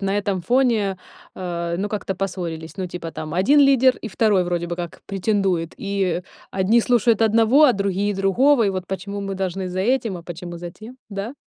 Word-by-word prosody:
на 195 Hz, 0 st, 0 dB
этом 200 Hz, -3 st, -1 dB
фоне, 225 Hz, -3 st, +2 dB, 0.4 s
э, 170 Hz, -2 st, -3 dB
ну 205 Hz, +1 st, -1 dB
как-то 200 Hz, -2 st, -3 dB
поссорились? 170 Hz, -4 st, -5 dB
Ну, 185 Hz, -, -3 dB
типа, 170 Hz, -2 st, -6 dB
там 155 Hz, 0 st, -6 dB
1 275 Hz, +11 st, +4 dB
лидер, 265 Hz, -2 st, +5 dB
и -, -, -7 dB
2 205 Hz, -2 st, +2 dB
вроде 175 Hz, -1 st, -2 dB
бы 175 Hz, 0 st, -4 dB
как 175 Hz, -2 st, -7 dB
претендует, 195 Hz, -4 st, 0 dB
и 195 Hz, -3 st, -1 dB, 0.3 s
одни 195 Hz, +5 st, +3 dB
слушают 235 Hz, -2 st, +2 dB
одного, 225 Hz, +6 st, +5 dB
а 270 Hz, -, +6 dB
другие- 200 Hz, 0 st, -1 dB
другого, 230 Hz, +7 st, +3 dB
и -, -, +2 dB
вот: 185 Hz, -1 st, -4 dB
"Почему 200 Hz, +2 st, -5 dB
мы 195 Hz, -1 st, -4 dB
должны 190 Hz, 0 st, -3 dB
за 185 Hz, +1 st, -3 dB
этим, 230 Hz, -2 st, 0 dB
а 170 Hz, -, -9 dB
почему 175 Hz, 0 st, -7 dB
за 175 Hz, 0 st, -7 dB
тем?" 225 Hz, +7 st, -12 dB
Да? 205 Hz, +5 st, -5 dB
195 Hz, 195 wpm, -22 LUFS, 180-220 Hz, 0.4 s, а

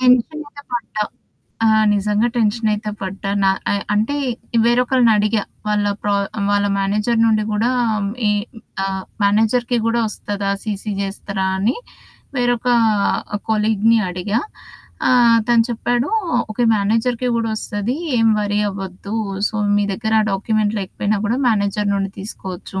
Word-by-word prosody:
Tension 255 Hz, +5 st, +3 dB
అయితే 285 Hz, 0 st, -12 dB
పడ్డా. 230 Hz, -3 st, -2 dB, 0.6 s
ఆ! -, -, +5 dB, 0.3 s
నిజంగా 210 Hz, +3 st, +1 dB
టెన్షన్ 220 Hz, 0 st, +1 dB
అయితే 210 Hz, 0 st, -3 dB
పడ్డా. 195 Hz, +1 st, -5 dB
న -, -, +3 dB, 0.3 s
అ -, -, +2 dB, 0.2 s
అంటే 220 Hz, +8 st, +1 dB, 0.5 s
వేరొకళ్ళని 245 Hz, 0 st, +3 dB
అడిగా. 210 Hz, 0 st, +1 dB, 0.3 s
వాళ్ళ 210 Hz, -1 st, +1 dB, 0.2 s
ప్రా 205 Hz, -1 st, +1 dB, 0.4 s
వాళ్ళ 205 Hz, 0 st, +2 dB
మేనేజర్ 210 Hz, +4 st, +1 dB
నుండి 215 Hz, -1 st, +2 dB
గూడా 225 Hz, +4 st, +1 dB, 0.6 s
ఈ -, -, +4 dB, 0.5 s
ఆహ్, 190 Hz, -1 st, -3 dB, 0.2 s
మేనేజర్‌కి 225 Hz, +4 st, +2 dB
గూడా 235 Hz, +1 st, +2 dB
ఒస్తదా? 205 Hz, -1 st, -3 dB
సీసీ 210 Hz, -1 st, -3 dB
జేస్తరా? 195 Hz, -1 st, -3 dB
అని 220 Hz, +8 st, +1 dB, 0.6 s
వేరొక 245 Hz, -1 st, +1 dB, 0.8 s
కొలీగ్‌ని 220 Hz, +1 st, +3 dB
అడిగా. 185 Hz, +5 st, -1 dB, 0.7 s
ఆహ్, 240 Hz, -2 st, +5 dB
తను 235 Hz, -1 st, +5 dB
చెప్పాడు 240 Hz, +3 st, 0 dB, 0.4 s
ఓకే 225 Hz, +3 st, 0 dB
మేనేజర్‌కి 230 Hz, +4 st, 0 dB
గూడా 230 Hz, -1 st, -1 dB
ఒస్తది. 210 Hz, +4 st, -2 dB, 0.2 s
ఏం 225 Hz, 0 st, +4 dB
వరీ 205 Hz, 0 st, 0 dB
అవ్వద్దు. 195 Hz, +1 st, -7 dB, 0.3 s
సో -, -, -12 dB, 0.2 s
మీ 205 Hz, -, +2 dB
దగ్గర 220 Hz, +2 st, -1 dB, 0.2 s
డాక్యుమెంట్ 215 Hz, +1 st, 0 dB
లేకపోయినా 200 Hz, +2 st, -2 dB
కూడా 235 Hz, +5 st, 0 dB
మేనేజర్ 205 Hz, -1 st, 0 dB
నుండి 195 Hz, -1 st, -1 dB
తీసుకోవచ్చు. 190 Hz, -2 st, -6 dB
215 Hz, 130 wpm, -19 LUFS, 200-235 Hz, 0.8 s, ఆ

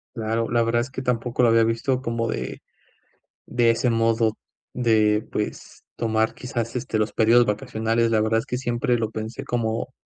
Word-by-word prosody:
Claro. 115 Hz, 0 st, -1 dB
La 120 Hz, -1 st, +3 dB
verdad 115 Hz, +1 st, +1 dB
es 125 Hz, +4 st, -4 dB
que 130 Hz, -, -5 dB
tampoco 125 Hz, 0 st, -1 dB
lo 120 Hz, -, +5 dB
había 115 Hz, 0 st, +5 dB
visto 115 Hz, +3 st, 0 dB
como 115 Hz, -2 st, -2 dB
de -, -, -4 dB, 0.9 s
de 120 Hz, -1 st, +3 dB
ese 120 Hz, +2 st, 0 dB
modo 115 Hz, -1 st, +1 dB, 0.4 s
de, 110 Hz, -3 st, +2 dB
pues, 105 Hz, -, -5 dB
tomar 110 Hz, -1 st, +1 dB
quizás, 120 Hz, -1 st, -4 dB
este, 115 Hz, -2 st, -2 dB
los 110 Hz, 0 st, 0 dB
periodos 115 Hz, +2 st, +4 dB
vacacionales, 110 Hz, +2 st, 0 dB
la 110 Hz, -1 st, +2 dB
verdad 115 Hz, +1 st, +2 dB
es 115 Hz, -, -6 dB
que 125 Hz, -, -3 dB
siempre 120 Hz, 0 st, 0 dB
lo 110 Hz, -1 st, -2 dB
pensé 110 Hz, +5 st, -5 dB
como 120 Hz, -1 st, -2 dB
115 Hz, 180 wpm, -23 LUFS, 110-120 Hz, 0.9 s, lo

